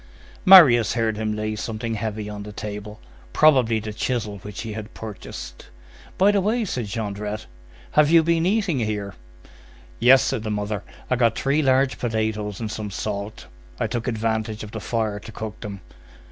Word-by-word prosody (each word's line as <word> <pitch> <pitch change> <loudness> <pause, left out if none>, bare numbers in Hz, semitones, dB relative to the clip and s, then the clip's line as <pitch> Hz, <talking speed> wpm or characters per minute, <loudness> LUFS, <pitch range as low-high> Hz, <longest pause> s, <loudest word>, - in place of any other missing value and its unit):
Marius 140 - +8
heard 115 -2 +1
him 110 0 -2
lay 110 0 -2
something 115 +2 -4
heavy 110 -1 -3
on 105 -1 -6
the 105 +1 -8
table, 105 +1 -7 0.3
probably 130 -7 +4
the 105 0 -6
chisel 110 -3 -2
which 105 +2 -7
he 110 -1 -5
had 110 0 -8
purchased. 100 - -8 0.5
"By 195 +2 +5
the 200 -1 +2
way," 220 +4 0
said 125 - -3
Jondrette, 105 0 -4 0.5
"have 150 -1 +4
you 165 0 +6
been 170 +1 +2
eating 200 - +1
here?" 105 -3 -2 0.9
"Yes," 130 +3 +7
said 135 -5 -1
the 110 - -4
mother. 105 -1 -2 0.3
"I 125 - +3
got 115 -2 +2
three 140 +3 +1
large 135 -1 +2
potatoes 110 -3 -2
and 110 -2 -4
some 105 -1 -4
salt. 100 +1 -5 0.3
I - - +1
took 120 0 -3
advantage 110 -1 -2
of 105 - -9
the 110 - -5
fire 110 -1 -1
to 110 - -11
cook 110 -1 -7
them." 100 -3 -7
110 Hz, 175 wpm, -23 LUFS, 105-125 Hz, 0.9 s, Marius